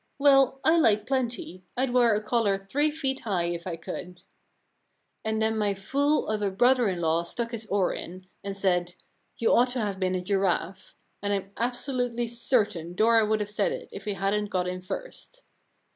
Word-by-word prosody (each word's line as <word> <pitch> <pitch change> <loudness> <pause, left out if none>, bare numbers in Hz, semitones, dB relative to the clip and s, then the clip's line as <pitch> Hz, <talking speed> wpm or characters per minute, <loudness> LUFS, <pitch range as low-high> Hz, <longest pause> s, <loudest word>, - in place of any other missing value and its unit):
" - - -47
Well, 270 -2 +5
I 320 +2 +5
like 215 -7 +3
plenty. 240 -8 -2
Fd 255 -1 0
wear 240 -3 +4
a 210 - -2
collar 205 -4 0
three 290 +8 +2
feet 280 -3 -2
high 195 -8 -1
if 170 +1 -5
I 170 - -3
could.' 180 +2 -8 0.5
* - - -47
And 220 0 -1
then 220 0 +1
my 205 -2 0
fool 280 +10 +1
of 215 -1 -1
a 205 - +1
brother 245 +3 +3
in 180 -2 -3
law 165 0 +2
stuck 230 +7 -4
his 225 -2 -6
oar 200 -3 +1
in, 185 +2 -8 0.2
and 200 0 -4
said, 180 -2 +1 0.4
You 230 - +2
ought 245 +2 +4
to 255 - -2
have 205 -4 -2
been 185 -1 0
a 180 - -1
giraffe; 190 -1 -1 0.3
and 205 0 -1
Fm 195 - -24
absolutely 245 0 -1
certain 215 -8 0
Dora 225 +1 +4
would 215 0 +1
have 205 - -3
said 485 - +1
it - - -6
if - - -9
he 210 - -1
hadn't 200 +2 0
got 180 -2 -1
in 180 0 -4
first.' - - -7
215 Hz, 200 wpm, -27 LUFS, 190-245 Hz, 0.5 s, Well